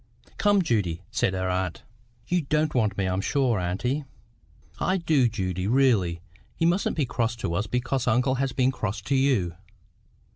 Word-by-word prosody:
"Come, 205 -2 +4
Judy," 95 - -1
said 95 - 0
her 95 0 -1
aunt. 90 -1 -2 0.4
"You 180 0 +1
don't 150 +1 0
want 105 -5 +1
me, 95 -1 0
I 90 - 0
am 95 - 0
sure, 125 -3 +1
auntie." 105 +12 -1 0.8
"I 185 - +1
do, 155 -8 +2
Judy, 95 -4 -2
really. 110 -9 +2 0.4
You 165 - +1
mustn't 175 +2 +1
be 150 - +2
cross 115 -1 -1
to 110 -7 -3
us 100 +5 -1
because 125 +2 -1
uncle 125 +3 +3
has 135 -1 0
been 130 +1 +2
cross 105 -5 -3
to 135 +7 -1
you. 130 -11 +2
120 Hz, 175 wpm, -26 LUFS, 95-135 Hz, 0.8 s, Come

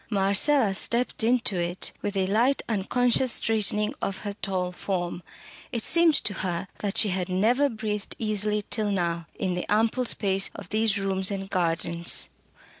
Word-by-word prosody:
Marcella 200 +4 +3
stepped 235 +4 +2
into 235 -3 +2
it 175 +1 -1
with 205 -1 -3
a 190 - +2
slight 235 +8 +1
unconscious 240 +4 +1
straightening 210 +1 +2
of 195 - -3
her 205 -1 -4
tall 185 -3 -3
form. 175 -1 -4 0.5
It 230 -2 -3
seemed 335 -2 +4
to 205 - +1
her 180 0 -3
that 205 -1 -3
she 215 - +4
had 185 -1 -2
never 235 +10 +2
breathed 210 -3 -4
easily 210 -1 0
till 215 -3 0
now, 170 -3 -2
in 185 -2 -1
the 180 +2 -4
ample 225 +4 +1
space 195 -4 +1
of - - -10
these 215 -1 +1
rooms 190 -1 0
and 195 -1 -5
gardens. 170 -1 0
205 Hz, 160 wpm, -26 LUFS, 190-225 Hz, 0.5 s, seemed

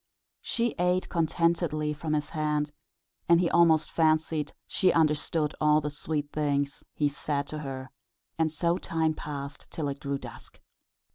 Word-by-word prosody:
She 235 0 0
ate 180 +1 +1
contentedly 165 -2 +1
from 155 +1 -3
his 150 -1 -1
hand, 150 -2 0 0.6
and 170 0 +7
he 175 -1 +1
almost 165 -2 +4
fancied 155 -1 +2
she 185 - +2
understood 155 -1 +1
all 150 0 +5
the 150 -1 -3
sweet 150 0 -3
things 145 -2 -1
he 150 - +2
said 140 0 -2
to 155 - -4
her, 135 -3 -6 0.4
and 160 -1 +1
so 170 +3 0
time 160 -1 0
passed 145 -2 -7
till 155 -3 -3
it 140 0 -5
grew 140 0 -2
dusk. - - -11
155 Hz, 150 wpm, -28 LUFS, 145-165 Hz, 0.6 s, and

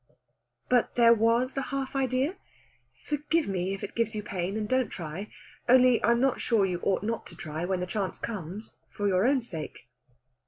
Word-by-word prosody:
"But 250 -2 +2
there 235 -1 +7
was 230 +3 +2
a 270 - 0
half 270 0 -4
idea? 270 +6 0 0.7
Forgive 300 +2 0
me 190 0 -1
if 195 - -10
it - - -5
gives 230 -1 -1
you 210 - -3
pain, 195 0 -3
and 215 -1 -2
don't 255 +1 +1
try. 175 +4 -6 0.4
Only 255 -1 +6
I'm 235 +2 +4
not 265 0 +1
sure 220 -5 +3
you 180 -2 -2
ought 195 0 +1
not 225 +2 -3
to - - -13
try 155 +1 -4
when 185 0 -1
the - - -1
chance 190 +1 -3
comes, 205 0 -6
for 205 - -2
your 190 +3 +3
own 265 -2 +2
sake." 160 - -7
225 Hz, 190 wpm, -28 LUFS, 190-255 Hz, 0.7 s, there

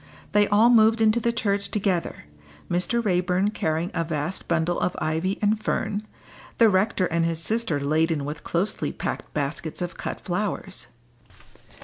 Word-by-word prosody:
They 205 0 +4
all 215 +4 +5
moved 225 -1 +5
into 220 +1 +4
the 235 0 +1
church 200 -3 -1
together, 195 -5 -1 0.5
Mr. 205 +7 0
Raeburn 180 +1 +1
carrying 160 -3 -1
a 165 - 0
vast 160 +2 -3
bundle 170 +1 +1
of 180 - -1
ivy 165 +5 -1
and 215 +1 +1
fern, 215 0 -2 0.5
the 230 -2 +6
rector 190 0 +2
and 170 -1 0
his 165 -1 0
sister 215 -4 0
laden 155 +1 +1
with 150 +1 -6
closely 180 +5 -1
packed - - -5
baskets 150 +2 -3
of 175 -1 -4
cut - - -5
flowers. 190 0 -3
185 Hz, 150 wpm, -25 LUFS, 165-215 Hz, 0.5 s, the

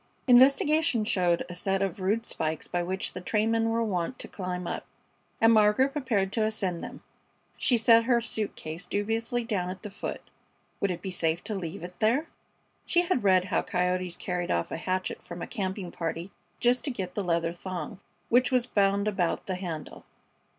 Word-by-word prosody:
Investigation 270 0 +5
showed 180 -5 +2
a 180 - -7
set 195 +2 0
of 195 -1 -3
rude 210 +5 0
spikes 155 -6 -2
by 175 - -1
which 185 +2 -2
the 185 - -6
trainmen 225 +3 +1
were 230 +1 +1
wont 200 +3 -2
to - - -4
climb 180 -2 -4
up, - - -3 0.6
and 225 0 +6
Margaret 215 +5 +5
prepared 230 -10 0
to 220 - +1
ascend 195 -6 -1
them. - - -8 0.5
She 245 - +2
set 230 0 +6
her 240 -1 +4
suit 220 -2 -2
case 160 +3 -6
dubiously 225 +4 -1
down 200 -6 -1
at 185 +3 -7
the 210 - -6
foot. 200 - -5 0.6
Would 200 - +1
it 180 - -4
be 190 - -3
safe 165 -1 0
to 220 - -4
leave 170 -4 -5
it 180 0 -9
there? 235 +8 +3 0.6
She 350 - +3
had 345 - 0
read 185 -2 +4
how 185 - +1
coyotes 180 0 -1
carried 180 -1 -3
off 85 0 0
a - - -2
hatchet 185 +2 -2
from 175 0 -8
a - - -2
camping 190 -4 -4
party, 170 +2 -4 0.3
just 245 +1 +3
to - - 0
get 190 -8 -4
the 205 - -2
leather 170 -1 0
thong 180 0 -6 0.3
which 250 +3 +4
was 250 -2 +3
bound 200 -3 +2
about 190 -5 0
the 190 - -2
handle. 170 -5 -6
195 Hz, 190 wpm, -28 LUFS, 180-230 Hz, 0.6 s, and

